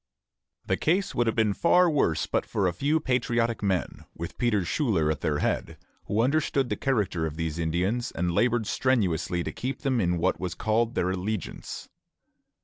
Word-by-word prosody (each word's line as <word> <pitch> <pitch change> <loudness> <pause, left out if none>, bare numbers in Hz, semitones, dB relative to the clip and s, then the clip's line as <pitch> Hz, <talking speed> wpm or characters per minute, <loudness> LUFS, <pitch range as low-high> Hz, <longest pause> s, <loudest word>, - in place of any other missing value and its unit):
The - - 0
case 185 +5 +1
would 120 -1 +1
have 115 - +1
been 110 -3 +2
far 180 - +4
worse 140 - +1
but - - 0
for 100 - 0
a 90 - +1
few 145 - +1
patriotic 120 -4 0
men, 95 -4 -1
with 85 +1 -7
Peter 105 -7 +1
Schuyler 85 - +1
at - - -4
their 75 -1 0
head, - - -1 0.3
who 110 +3 +1
understood 140 -1 +1
the - - 0
character 105 - 0
of 75 - -6
these 80 0 -3
Indians, 90 +9 0
and 90 +1 -1
labored 120 +3 +2
strenuously 95 -9 0
to - - -4
keep 130 +2 -4
them 130 -4 +1
in 90 -2 +1
what 85 - 0
was 90 -2 -3
called 115 +2 0
their 90 - +1
allegiance. 95 +2 -4
110 Hz, 180 wpm, -27 LUFS, 90-125 Hz, 0.3 s, far